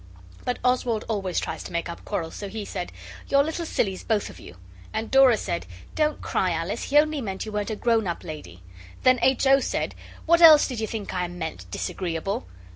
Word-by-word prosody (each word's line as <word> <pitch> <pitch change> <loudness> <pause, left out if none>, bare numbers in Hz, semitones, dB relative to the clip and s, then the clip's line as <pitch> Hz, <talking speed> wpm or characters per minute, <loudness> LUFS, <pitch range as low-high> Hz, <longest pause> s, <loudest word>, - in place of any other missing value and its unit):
But 250 - -1
Oswald 250 -3 +1
always 195 -5 -1
tries - - -4
to - - -7
make 170 0 -2
up 170 - -8
quarrels, 165 -6 -3
so 200 - -6
he 210 +1 -5
said 180 -3 -5 0.4
'You're 280 0 +4
little 320 +2 -3
sillies, 190 -10 -1
both 215 -2 0
of - - -14
you!' 90 - -12 0.3
And 220 +1 -3
Dora 265 -4 +6
said, 85 - -3 0.3
'Don't 305 -1 0
cry, 185 - 0
Alice; 170 +6 -2
he 290 - +2
only 305 -1 +3
meant 195 -3 -4
you 215 - -6
weren't 210 0 -2
a 220 - -2
grown 225 -2 +1
up 170 - -3
lady.' 90 - -9 0.4
Then 255 -1 +5
H. 265 +1 +3
O. 270 +1 +6
said, - - -2 0.3
'What 340 +1 +4
else 315 -3 +9
did 250 -5 -5
you 220 - -1
think 215 -3 -5
I 180 -1 -1
meant, 160 - -6
Disagreeable? 165 - -3
210 Hz, 205 wpm, -25 LUFS, 175-255 Hz, 0.4 s, else